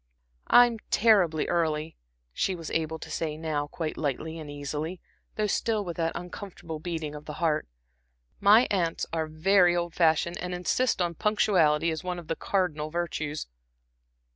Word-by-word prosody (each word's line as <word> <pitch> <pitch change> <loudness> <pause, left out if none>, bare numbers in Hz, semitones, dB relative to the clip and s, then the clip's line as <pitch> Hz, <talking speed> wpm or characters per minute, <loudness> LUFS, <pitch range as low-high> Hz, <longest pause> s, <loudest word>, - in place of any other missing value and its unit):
"I'm 240 -2 +6
terribly 190 -8 +4
early," 160 -2 0 0.4
she 190 - 0
was 165 -2 -7
able 160 0 -1
to 160 0 -9
say 155 -1 -2
now, 155 -2 -2
quite 155 +1 -4
lightly 160 +3 -3
and 155 -2 -8
easily, 150 +4 -4 0.4
though 215 - 0
still 210 0 0
with 170 -2 -4
that 165 -1 0
uncomfortable 175 -3 -7
beating 160 -2 -4
of 150 0 -9
the 150 - -6
heart. 160 -3 0 0.7
"My 210 +5 +6
aunts 175 -5 0
are 160 -1 -1
very 175 +3 +4
old 175 -1 -2
fashioned, 170 0 +2
and 180 0 -3
insist 190 +3 +1
on 170 -1 -1
punctuality 170 -5 +2
as 160 +2 -4
one 180 -1 -3
of 170 -3 -10
the 165 - 0
cardinal 160 -7 -1
virtues." 155 -3 -3
165 Hz, 160 wpm, -27 LUFS, 155-180 Hz, 0.7 s, I'm